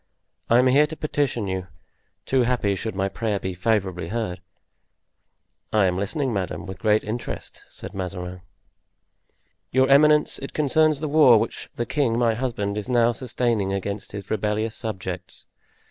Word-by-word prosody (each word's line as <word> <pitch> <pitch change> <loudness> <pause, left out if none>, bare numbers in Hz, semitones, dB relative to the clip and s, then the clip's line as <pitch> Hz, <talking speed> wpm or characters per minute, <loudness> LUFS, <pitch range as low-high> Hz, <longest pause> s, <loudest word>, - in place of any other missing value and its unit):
I 115 - +6
am 125 - +5
here 140 +4 +5
to 160 - -7
petition 145 -7 -1
you, 95 -1 -3 0.6
too 130 -1 +2
happy 120 -5 +1
should 105 +2 -4
my 95 0 0
prayer 105 0 -2
be 95 0 -4
favorably 95 -3 -1
heard." 95 -4 -3 1.3
"I 105 -2 +4
am 90 -1 +1
listening, 115 +7 -2
madame, 90 -4 -3
with 95 -1 -7
the - - -27
greatest 105 -1 +2
interest," 115 +2 -5
said - - -9
Mazarin. 90 -1 -5 1.3
"Your 130 +1 +3
eminence, 150 +2 +5
it 135 - -7
concerns 155 0 +3
the 155 - -1
war 145 -6 +6
which 110 +1 -3
the 120 - -2
king, 130 -6 0
my 120 -2 +3
husband, 105 -4 -2
is 105 - -7
now 120 -1 +4
sustaining 115 -4 -1
against 100 +1 -4
his 100 -1 -8
rebellious 110 +1 -1
subjects. 95 -4 -5
110 Hz, 160 wpm, -24 LUFS, 95-125 Hz, 1.3 s, I